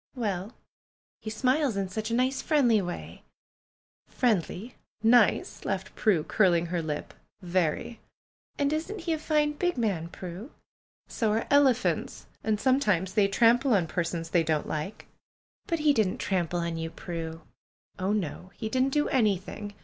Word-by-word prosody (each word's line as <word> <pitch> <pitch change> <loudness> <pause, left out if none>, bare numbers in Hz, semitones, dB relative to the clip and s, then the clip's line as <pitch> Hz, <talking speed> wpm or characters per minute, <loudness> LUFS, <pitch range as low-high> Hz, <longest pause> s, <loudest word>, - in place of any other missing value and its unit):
^^Well! 205 -2 -2 0.7
He 215 - -5
smiles 255 +2 +1
in 195 -1 -1
such 215 +4 -4
a 230 - 0
nice, 260 +2 +1
friendly 245 -9 +3
way 175 -1 -6 0.4
!" - - -61
"Friendly! 220 -1 0 0.3
Nice!" 230 -1 +3
laughed 190 -1 -3
Prue, 185 -8 +2
curling 175 -4 +3
her 170 0 -2
lip. 150 -2 -4 0.3
"Very!" 180 +5 -1 0.6
"And 285 +1 +1
isn't 350 +6 -3
he 330 0 -1
a 315 - -2
fine, 300 -1 +1
big 355 +1 -1
man, 195 -9 0
Prue?" 180 +7 -8 0.6
"So 220 -3 0
are 225 - 0
elephants! 270 -4 +2 0.2
And 215 -1 0
sometimes 210 -8 +2
they 205 -2 +4
trample 235 +4 +4
on 180 -4 +2
persons 165 0 -3
they 175 - +4
don't 155 -2 0
like." 155 +7 -4 0.6
"But 335 -4 0
he 300 -1 +4
didn't 215 -7 +1
trample 175 -2 -1
on 170 0 -2
3 - - -4
^ou, 165 - -12
Prue?" 165 -1 -5 0.6
"Oh, 190 +2 0
no! 185 -3 -3
lie 220 - -3
didn't 260 +3 +2
do 295 0 +2
anything. 205 -3 0
210 Hz, 155 wpm, -28 LUFS, 175-255 Hz, 0.7 s, they